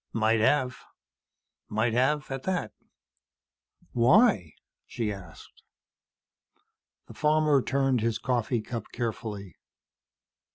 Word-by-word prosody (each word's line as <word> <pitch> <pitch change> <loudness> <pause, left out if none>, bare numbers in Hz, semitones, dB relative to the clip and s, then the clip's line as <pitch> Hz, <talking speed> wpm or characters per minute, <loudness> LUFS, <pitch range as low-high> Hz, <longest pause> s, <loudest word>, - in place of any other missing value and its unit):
"Might 110 0 +2
have. 125 +2 +2 0.9
Might 110 +2 0
have, 135 +4 +1
at 135 -1 -3
that." 185 +3 -2 1.2
"Why?" 120 - +4 0.3
she 110 -4 -3
asked. 90 -4 -13 1.4
The - - -12
farmer 150 -2 +3
turned 135 -2 +1
his 115 -1 0
coffee 120 -1 -1
cup 115 0 -6
carefully. 110 -5 -5
120 Hz, 90 wpm, -27 LUFS, 110-140 Hz, 1.4 s, Why